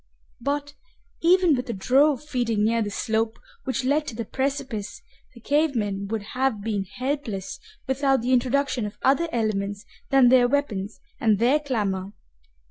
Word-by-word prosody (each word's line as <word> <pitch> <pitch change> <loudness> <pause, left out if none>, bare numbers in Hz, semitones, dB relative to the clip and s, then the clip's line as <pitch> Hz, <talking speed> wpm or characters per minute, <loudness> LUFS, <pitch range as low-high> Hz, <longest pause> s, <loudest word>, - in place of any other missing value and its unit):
But, 285 +3 -2 0.5
even 355 -2 +5
with 250 -1 -4
a - - -1
drove 265 +8 +3
feeding 240 -7 -1
near 230 +1 +2
the 210 - -1
slope 220 +1 -1 0.3
which 265 0 -1
led 295 +3 +1
to 245 - -5
the 230 0 -4
precipice, 260 -5 -3 0.3
the - - -12
cave 290 +4 +1
men 200 -3 -2
would 220 0 -3
have 260 -4 0
been 205 -3 -1
helpless 250 -4 -4 0.3
without 270 -1 +1
the 255 +2 +1
introduction 255 -2 +1
of 205 - -10
other 305 +6 +3
elements 205 -3 -2 0.2
than 270 -3 +6
their 250 -1 +6
weapons 220 -7 -2 0.2
and 220 -3 +3
their 250 +7 +3
clamor. 205 -9 -2
245 Hz, 155 wpm, -25 LUFS, 215-280 Hz, 0.5 s, than